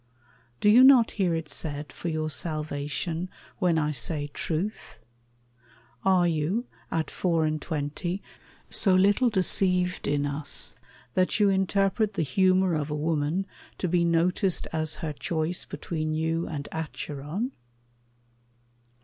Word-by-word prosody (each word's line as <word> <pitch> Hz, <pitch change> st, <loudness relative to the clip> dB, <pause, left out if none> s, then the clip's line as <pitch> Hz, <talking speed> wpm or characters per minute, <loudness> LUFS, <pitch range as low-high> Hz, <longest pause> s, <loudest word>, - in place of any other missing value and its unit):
Do -, -, +3 dB
you 230 Hz, +5 st, +8 dB
not 260 Hz, -4 st, +7 dB
hear 180 Hz, -5 st, +1 dB
it 165 Hz, -1 st, -3 dB
said 150 Hz, -1 st, -4 dB
for 175 Hz, -, -4 dB
your 155 Hz, -1 st, -2 dB
salvation, 155 Hz, +3 st, -3 dB, 0.3 s
When 180 Hz, -4 st, +2 dB
I 150 Hz, -1 st, +1 dB
say 145 Hz, +1 st, -3 dB
truth? 180 Hz, +7 st, -3 dB, 1.1 s
Are 185 Hz, -2 st, +4 dB
you, 170 Hz, +9 st, 0 dB, 0.2 s
at 160 Hz, -1 st, -2 dB
four 165 Hz, -3 st, +1 dB
and 155 Hz, -1 st, -1 dB
twenty, 165 Hz, +5 st, -3 dB, 0.5 s
So 190 Hz, -3 st, +4 dB
little 200 Hz, +6 st, +4 dB
deceived 180 Hz, -2 st, +2 dB
in 145 Hz, 0 st, +1 dB
us 145 Hz, -5 st, -1 dB, 0.4 s
that 185 Hz, 0 st, +1 dB
you 205 Hz, -1 st, +5 dB
interpret 195 Hz, +2 st, +1 dB
The 165 Hz, -, +1 dB
humor 185 Hz, +4 st, +3 dB
of 155 Hz, -1 st, -1 dB
a 150 Hz, -, -2 dB
woman 155 Hz, +4 st, 0 dB, 0.3 s
to 185 Hz, -, -1 dB
be 175 Hz, 0 st, +2 dB
noticed 170 Hz, +2 st, +1 dB
As 155 Hz, -1 st, -1 dB
her 150 Hz, -, -2 dB
choice 160 Hz, +3 st, -2 dB
between 155 Hz, -2 st, -3 dB
you 160 Hz, +1 st, -1 dB
and 145 Hz, -3 st, -5 dB
Acheron? 160 Hz, -, -4 dB
165 Hz, 130 wpm, -27 LUFS, 155-185 Hz, 1.1 s, you